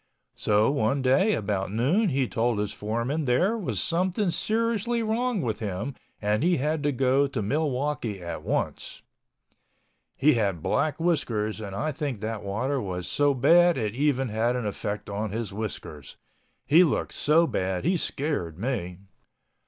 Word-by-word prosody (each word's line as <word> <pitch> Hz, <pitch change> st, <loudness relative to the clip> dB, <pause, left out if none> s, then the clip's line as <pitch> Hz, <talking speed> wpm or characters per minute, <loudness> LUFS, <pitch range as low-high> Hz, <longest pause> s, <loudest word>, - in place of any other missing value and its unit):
So 105 Hz, +4 st, +2 dB
one 135 Hz, 0 st, 0 dB
day 165 Hz, +12 st, +3 dB
about 100 Hz, -2 st, -2 dB
noon 150 Hz, -, +2 dB
he 135 Hz, -3 st, +1 dB
told 115 Hz, 0 st, 0 dB
his 105 Hz, -1 st, -2 dB
foreman 115 Hz, +8 st, -2 dB
there 175 Hz, -, +2 dB
was 210 Hz, -7 st, -2 dB
something 185 Hz, +3 st, +1 dB
seriously 230 Hz, +4 st, 0 dB
wrong 225 Hz, -, 0 dB
with 115 Hz, -3 st, -2 dB
him 105 Hz, +5 st, -3 dB, 0.3 s
and 105 Hz, +1 st, 0 dB
he 175 Hz, +2 st, +3 dB
had 150 Hz, +3 st, -1 dB
to 145 Hz, 0 st, +1 dB
go 135 Hz, +2 st, +2 dB
to 135 Hz, -3 st, -4 dB
Milwaukee 130 Hz, -2 st, -1 dB
at 85 Hz, -1 st, -6 dB
once. -, -, -3 dB, 1.1 s
He 150 Hz, +3 st, +4 dB
had 100 Hz, -8 st, 0 dB
black 155 Hz, 0 st, 0 dB
whiskers 115 Hz, -11 st, 0 dB
and 100 Hz, -2 st, -6 dB
I 155 Hz, +9 st, -1 dB
think 140 Hz, -6 st, -4 dB
that 110 Hz, 0 st, -4 dB
water 125 Hz, +8 st, -1 dB
was 90 Hz, -3 st, -4 dB
so 145 Hz, -1 st, +2 dB
bad 170 Hz, +6 st, +5 dB
it 105 Hz, -4 st, -1 dB
even 135 Hz, -1 st, +1 dB
had 115 Hz, +3 st, 0 dB
an 125 Hz, -3 st, -2 dB
effect 105 Hz, 0 st, -4 dB
on 105 Hz, +2 st, -3 dB
his 110 Hz, -1 st, -4 dB
whiskers. 95 Hz, -9 st, -6 dB, 0.5 s
He 165 Hz, +5 st, +6 dB
looked 155 Hz, -, 0 dB
so 160 Hz, +3 st, +3 dB
bad 95 Hz, -, -2 dB
he 180 Hz, +3 st, +3 dB
scared 140 Hz, -, -2 dB
me. 100 Hz, -6 st, -3 dB
130 Hz, 160 wpm, -26 LUFS, 105-155 Hz, 1.1 s, He